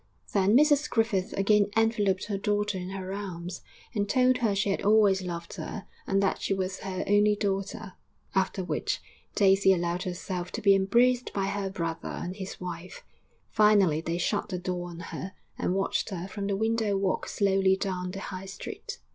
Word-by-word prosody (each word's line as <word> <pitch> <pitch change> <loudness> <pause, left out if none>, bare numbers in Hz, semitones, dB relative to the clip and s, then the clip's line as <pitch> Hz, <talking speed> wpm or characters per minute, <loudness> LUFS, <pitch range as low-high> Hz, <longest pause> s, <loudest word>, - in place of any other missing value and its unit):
Then 200 +3 +4
Mrs 295 0 +4
Griffith 225 -5 +1
again 205 +1 +3
enveloped 210 -4 +2
her 205 -2 -2
daughter 205 0 0
in 180 0 -4
her 190 0 -5
arms, 180 -3 -6 0.3
and 205 -3 -1
told 255 -1 +4
her 220 -4 +1
she 195 0 +1
had - - -1
always 205 -2 +4
loved 170 -2 -6
her - - -6 0.2
and 195 0 +2
that 195 - 0
she 195 - 0
was 190 0 -3
her 190 -1 -3
only 205 +1 +4
daughter; 200 0 -3 0.4
after 190 0 0
which, 180 - -1 0.4
Daisy 195 -1 +5
allowed 175 -1 0
herself 180 0 -4
to - - -3
be 200 -1 +7
embraced 240 +6 +3
by 195 -1 0
her 200 0 -2
brother 165 -3 -4
and 180 +3 -5
his 190 -1 -6
wife. 180 0 -7 0.5
Finally 205 -8 +4
they 165 +1 -2
shut 205 +4 -1
the 185 - -2
door 180 0 -3
on 170 -1 -9
her 185 +2 -6 0.2
and 180 - -1
watched 195 +2 0
her 185 -2 -5
from 200 +1 -4
the 200 -1 0
window 220 -2 +1
walk 195 -1 0
slowly 195 -1 +2
down 185 -2 -2
the 195 +1 -6
High 190 -1 -6
Street. 455 - -7
195 Hz, 180 wpm, -28 LUFS, 185-205 Hz, 0.5 s, be